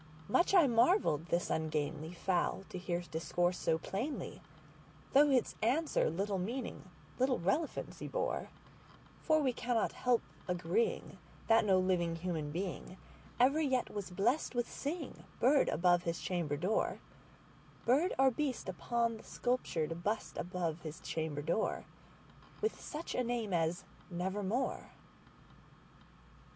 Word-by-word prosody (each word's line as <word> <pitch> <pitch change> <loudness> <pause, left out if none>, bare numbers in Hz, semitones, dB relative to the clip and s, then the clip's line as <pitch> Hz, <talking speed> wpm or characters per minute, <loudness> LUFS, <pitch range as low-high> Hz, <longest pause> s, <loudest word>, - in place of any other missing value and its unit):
Much 350 - +3
I 350 -5 +8
marvelled 230 - +3
this 170 +1 0
ungainly 155 0 -1
fowl 180 +1 0
to 185 - -5
hear 175 -1 -2
discourse 175 +1 -1
so 160 - +2
plainly, 215 - -4 0.7
Though 290 +2 +7
its 260 -3 +2
answer 280 +8 +2
little 195 +4 -1
meaning—little 255 +4 -3
relevancy 200 - -1
bore; - - -2 0.7
For 310 -2 +3
we 260 -2 +2
cannot 240 -1 0
help 245 -2 +1 0.2
agreeing 310 - 0 0.3
that 225 -1 +5
no 190 -2 +5
living 180 -3 +1
human 165 -4 -3
beingEver 195 - -1
yet 265 -5 0
was 205 -3 -4
blessed 235 - 0
with 240 -1 +1
seeing 300 0 -5 0.2
bird 270 +3 +4
above 175 +1 +3
his 170 -1 -2
chamber 165 -6 -1
door, 185 +8 0 0.9
Bird 285 +10 +4
or 265 0 +5
beast 270 0 -2
upon 230 +4 0
the - - -13
sculptured 170 -10 -1
bust 210 +3 -1
above 175 -2 -2
his 160 +2 -7
chamber 160 -4 -3
door, 170 +8 0 0.7
With 435 +1 -1
such 315 +2 -5
name 240 -5 -1
as 165 0 +1 0.3
"Nevermore." 190 +7 -2
195 Hz, 120 wpm, -34 LUFS, 175-255 Hz, 0.9 s, I